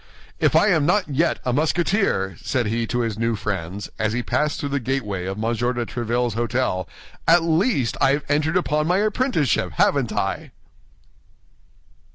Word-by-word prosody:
"If - - +2
I 210 - +5
am 160 -6 +2
not 185 -1 +2
yet 155 +5 +1
a 125 - 0
Musketeer," 155 - +1
said 120 -2 -1
he 115 +2 -1
to 120 +1 -1
his 110 -2 -3
new 115 0 +1
friends, 100 -2 -4
as 110 0 0
he 120 +1 -1
passed 150 +3 0
through 145 - -3
the 140 0 0
gateway 110 -8 -2
of 95 +1 -4
M. - - -5
de 120 +1 -1
Tréville's 120 +1 -1
hôtel, 120 -6 -1 0.4
"at 165 0 +6
least 165 - +1
I 135 - +4
have 145 - -1
entered 155 +4 +1
upon 150 -3 0
my 180 +2 +2
apprenticeship, 215 - 0
haven't - - +2
I?" - - -3
130 Hz, 170 wpm, -22 LUFS, 115-160 Hz, 0.4 s, at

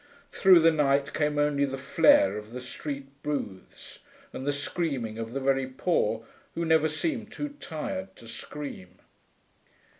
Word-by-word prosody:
Through 185 -3 +6
the 165 +1 +6
night 140 -2 +2
came 150 -1 0
only 145 -1 +2
the 135 -1 -1
flare 135 -7 +4
of 105 +2 -8
the 125 - -4
street 140 +2 -6 0.2
booths 140 -11 -5 0.3
and 135 - -6
the - - +3
screaming 140 -6 -3
of 115 0 -4
the 135 - -1
very 135 -1 +1
poor, 130 -5 0 0.3
who 170 - -1
never 160 -1 +4
seem 230 - -2
too 295 +6 -5
tired 95 -12 -5
to 115 - -14
scream. 115 -6 -8
140 Hz, 150 wpm, -28 LUFS, 115-155 Hz, 0.3 s, Through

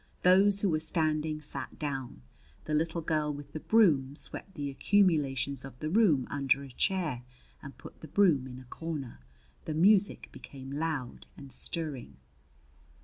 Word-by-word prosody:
Those 195 +2 +5
who 200 - +2
were 155 - +1
standing 155 -1 0
sat 150 - -3
down. 135 - -5 0.4
The 155 - -3
little 160 +2 0
girl 155 -1 0
with 145 0 -9
the 155 - -4
broom 150 -11 +3
swept 195 +5 -2
the 140 -1 -3
accumulations 140 -7 +1
of 135 -2 -10
the 155 +3 -4
room 175 - +4
under 140 -1 +1
a 135 - -10
chair 155 -4 -1 0.4
and 140 - -11
put - - -13
the 160 - -9
broom 155 -6 +3
in 125 -1 -9
a 130 - -12
corner. 145 - -6 0.5
The 155 - -3
music 195 +4 +3
became 135 -1 -10
loud 145 -4 -4
and 140 -2 -11
stirring. 145 - -4
150 Hz, 155 wpm, -30 LUFS, 135-165 Hz, 0.5 s, Those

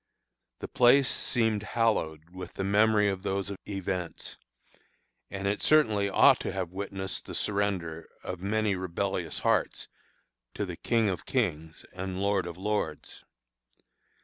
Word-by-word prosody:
The - - -4
place 125 +2 +5
seemed 115 -4 +1
hallowed 90 -8 -1
with 95 -1 -9
the - - -2
memory 105 +1 +4
of 95 -2 -1
those 100 0 -2 0.2
events; 95 -3 -4 0.9
and 100 0 -4
it 100 +1 -1
certainly 110 -10 +4
ought 95 - +6
to - - -3
have 95 -3 -3
witnessed 95 0 -5
the - - -6
surrender 95 -6 -2
of 90 -1 -5
many 105 +2 0
rebellious 90 -2 -3
hearts - - 0 0.7
to 105 - -1
the 90 -3 -6
"King 115 +5 +1
of 90 -4 -3
kings 80 - -2
and 95 0 -4
Lord 100 -2 +1
of 85 -1 -7
lords." 95 -6 -3
95 Hz, 135 wpm, -29 LUFS, 90-105 Hz, 0.9 s, ought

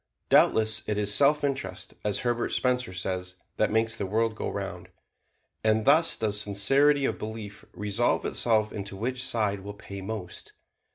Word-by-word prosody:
Doubtless 110 -1 +4
it 105 - -1
is 105 -1 +1
self 145 +5 +4
interest, 140 -2 -3
as 105 -2 0
Herbert 120 -1 -1
Spencer 125 -4 0
says, 90 0 -4 0.2
that 110 - +2
makes 110 +1 +1
the 100 -4 -4
world 110 +3 0
go 110 - -4
round. 95 -3 -6 0.7
And 110 0 +2
thus 155 +4 +5
does 105 -2 0
sincerity 135 +8 +3
of - - -2
belief 105 -2 -7
resolve 105 +3 0
itself 110 -2 +1
into 100 -1 -6
which 125 +4 -3
side 110 -5 -1
will 100 +1 -8
pay 100 -1 -9
most. 95 -3 -7
110 Hz, 160 wpm, -27 LUFS, 100-120 Hz, 0.7 s, thus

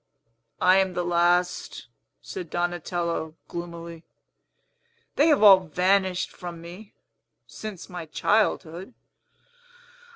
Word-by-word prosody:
"I 185 +1 +5
am 190 -1 +1
the 180 - -1
last," 175 +1 0 0.4
said 375 -3 -7
Donatello 175 -2 -2
gloomily. 170 -1 -8 1.1
"They 295 - +4
have 295 -8 +4
all 195 -3 +9
vanished 185 +2 0
from 175 -2 -8
me, 180 +5 -12 0.5
since 215 -5 -8
my 175 -3 -8
childhood. 190 +2 0
180 Hz, 95 wpm, -25 LUFS, 170-190 Hz, 1.1 s, all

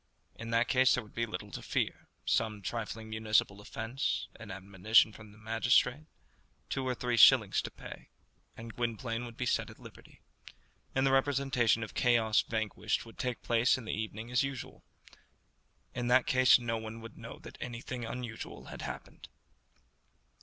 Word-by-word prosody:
In 115 - -8
that 115 +2 +2
case 130 -1 +4
there 125 - -3
would 105 - -17
be 115 0 -1
little 105 -1 -6
to - - -6
fear, - - -2 0.2
some 105 -2 0
trifling 110 +2 -4
municipal 110 -2 +1
offence, 115 +6 -3
an 115 -2 -10
admonition 100 +3 +3
from 105 -1 -13
the 105 - -17
magistrate, 120 +6 +2 0.6
two 130 -1 -1
or 125 - 0
three 125 0 -1
shillings - - +7
to - - -6
pay, - - -11 0.5
and 115 0 -8
Gwynplaine 115 0 -2
would 115 0 -10
be 125 - -2
set - - 0
at - - -13
liberty, - - -15 0.8
and 130 0 +3
the 135 - +3
representation 135 -4 +2
of 110 - -7
"Chaos 115 -3 +3
Vanquished" 110 -2 -2
would 115 - -14
take 125 -2 -3
place 120 +2 +3
in 125 - -8
the - - -3
evening 110 +2 -5
as 125 - +3
usual. 135 -3 -5 1.1
In 120 -1 -2
that 125 +1 +5
case 130 -2 +6
no 115 -2 -2
one 110 +1 -7
would 115 -1 -10
know - - -9
that - - -12
anything 120 +1 -5
unusual 115 -1 -6
had - - -8
happened. - - -8
115 Hz, 165 wpm, -32 LUFS, 110-125 Hz, 1.1 s, shillings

